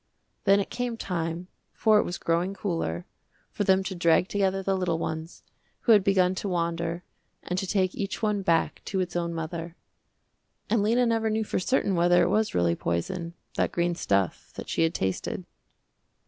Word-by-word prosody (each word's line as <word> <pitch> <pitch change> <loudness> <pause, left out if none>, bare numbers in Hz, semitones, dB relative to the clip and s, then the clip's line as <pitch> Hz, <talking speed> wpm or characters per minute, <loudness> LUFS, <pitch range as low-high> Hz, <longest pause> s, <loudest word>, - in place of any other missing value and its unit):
Then 200 0 +6
it 200 - -3
came 245 -1 -2
time, 170 -3 -3 0.3
for 215 -1 +4
it - - +3
was 175 - -4
growing 175 +4 0
cooler, 165 - -2 0.5
for - - -1
them 190 -1 +3
to 190 - -4
drag 170 +1 +3
together 195 -1 0
the 195 0 +1
little 180 -3 0
ones, 160 0 -5 0.4
who 235 - +3
had 210 -3 +7
begun 185 -2 +3
to 200 - -3
wander, 170 0 -1 0.4
and 180 +1 -2
to 190 - -3
take 185 -1 +1
each 200 -1 -3
one 210 -2 0
back 165 -3 +1
to 195 - -2
its 180 -1 -2
own 170 -1 -1
mother. 165 +1 -5 1.0
And 230 -2 +3
Lena 235 +4 +3
never 225 -1 +1
knew 220 +1 0
for 210 - -1
certain 200 0 +1
whether 175 0 +4
it - - +2
was 215 0 +1
really 85 -1 +3
poison, 165 - -3 0.2
that - - +1
green 175 0 +1
stuff 100 - -1
that - - -7
she - - 0
had 165 0 +2
tasted. 95 -1 -2
180 Hz, 185 wpm, -27 LUFS, 170-200 Hz, 1.0 s, had